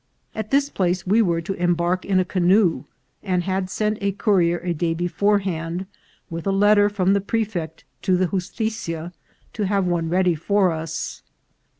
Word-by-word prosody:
At 220 -1 -5
this 280 +1 +3
place 185 -1 0
we 210 +5 +4
were 170 -5 +1
to 195 +4 -3
embark 175 0 0
in 190 -2 +2
a 185 - +1
canoe, 185 0 +2 0.4
and 180 -3 0
had 185 0 -2
sent 215 +2 -1
a 200 -1 0
courier 185 -4 +2
a 175 -1 -1
day 165 +1 -1
beforehand, 175 -1 0 0.4
with 165 +1 -6
a - - +2
letter 205 +1 +4
from 195 -2 +1
the 200 - +2
prefect 200 -7 -3 0.2
to 185 -1 +2
the 185 - +2
justitia, 180 -2 -3 0.4
to 210 -3 -1
have 200 -1 +1
one 170 -2 0
ready 180 0 +2
for 185 +4 +2
us. 160 0 -5
185 Hz, 170 wpm, -22 LUFS, 175-200 Hz, 0.4 s, we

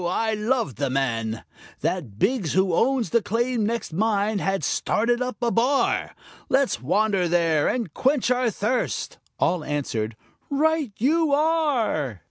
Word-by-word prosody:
I 220 +5 0
loved 215 - -1
the 140 - -1
man, 115 -4 -1 0.4
That 135 - -2
Biggs 200 - 0
who 190 0 +2
owns 250 +5 +1
the 235 - +3
claim 230 0 0
next 230 -7 -3
mine 210 +2 +1
had 195 -2 -1
started 235 - 0
up 250 0 -3
a 235 - +2
bar. 255 +5 +1 0.3
Let's 265 - +1
wander 195 +5 +1
there 165 -3 +2
and 230 -11 -2
quench 265 -2 +1
our 250 -1 +2
thirst." 225 +4 -2 0.2
All 175 -3 +1
answered, 115 -8 -3 0.3
"Right 305 -2 +1
you 305 +4 +2
are." 280 - +1
220 Hz, 140 wpm, -24 LUFS, 160-255 Hz, 0.4 s, the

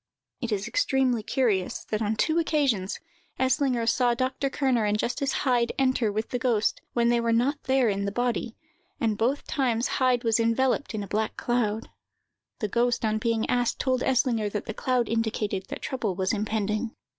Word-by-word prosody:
It 240 -2 -3
is 200 -1 -1
extremely 265 - +1
curious 210 -6 0
that, 215 0 0
on 215 0 0
two 315 +9 +2
occasions, 275 - 0 0.4
Eslinger 260 -2 +1
saw 240 +1 +3
Dr. 260 +2 -1
Kerner 265 -5 +1
and 210 0 +1
Justice 270 +5 -1
Heyd 245 -3 +2
enter 255 -5 +2
with 215 +2 -3
the 245 - -2
ghost, 230 -5 +1
when 235 -1 +2
they 240 0 +3
were 230 0 +1
not 260 +6 +1
there 260 -2 +3
in 200 -1 0
the 200 - -1
body, 240 0 -1 0.4
and 220 -2 +1
both 250 +7 0
times 245 -4 0
Heyd 255 -2 +2
was 225 -1 +2
enveloped 240 +3 +1
in 210 - -2
a - - -7
black 215 +3 -2
cloud. 230 -2 -1 0.7
The 210 - 0
ghost, 240 +2 +1
on 215 0 +1
being 230 0 0
asked, 245 -1 +1
told 255 -1 0
Eslinger 240 -5 +1
that 210 - -3
the 220 - -4
cloud 250 0 0
indicated 215 -3 -1
that - - -6
trouble 230 -8 -2
was 190 +2 0
impending. 215 +1 -1
235 Hz, 180 wpm, -26 LUFS, 215-255 Hz, 0.7 s, saw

